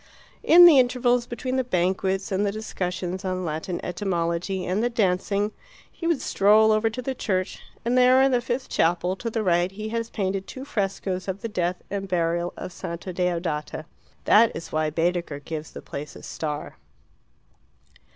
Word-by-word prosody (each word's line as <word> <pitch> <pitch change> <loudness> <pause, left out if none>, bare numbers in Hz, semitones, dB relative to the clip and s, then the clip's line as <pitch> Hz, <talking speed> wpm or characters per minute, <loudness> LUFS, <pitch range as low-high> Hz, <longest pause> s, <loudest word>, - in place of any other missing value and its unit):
In 350 +2 +8
the 315 -6 +8
intervals 245 -1 +2
between 255 +2 -3
the 260 - +2
banquets 190 -2 0
and 195 +1 +1
the 200 - +1
discussions 185 -3 -4
on 185 -1 -2
Latin 160 +3 -3
etymology 180 0 -2
and 185 +4 0
the 240 - +1
dancing, 200 -1 0 0.4
he 335 - -5
would 335 -5 +1
stroll 215 +2 +4
over 215 +1 +2
to 250 +3 -6
the 265 - -2
church, 185 -6 -2 0.3
and 240 +1 +1
there 255 +1 +6
in 270 - +3
the 245 -1 +2
fifth 240 +2 -3
chapel 175 +2 +1
to 230 - -4
the 225 -1 -2
right 175 -1 +2
he 215 +2 -6
has 230 0 -3
painted 195 -2 -2
two 260 +1 -8
frescoes 195 -5 -2
of 190 +1 -4
the - - -3
death 180 -3 -2
and 195 -1 -3
burial 170 -1 0
of 180 - -7
Santa 170 +2 -6
Deodata. 170 -4 -2 0.4
That 225 +2 +6
is 165 - -7
why 155 0 0
Baedeker 170 -1 -1
gives 155 +1 -6
the - - -10
place 145 +2 -7
a - - -12
star. 150 -2 -5
190 Hz, 175 wpm, -25 LUFS, 175-230 Hz, 0.4 s, In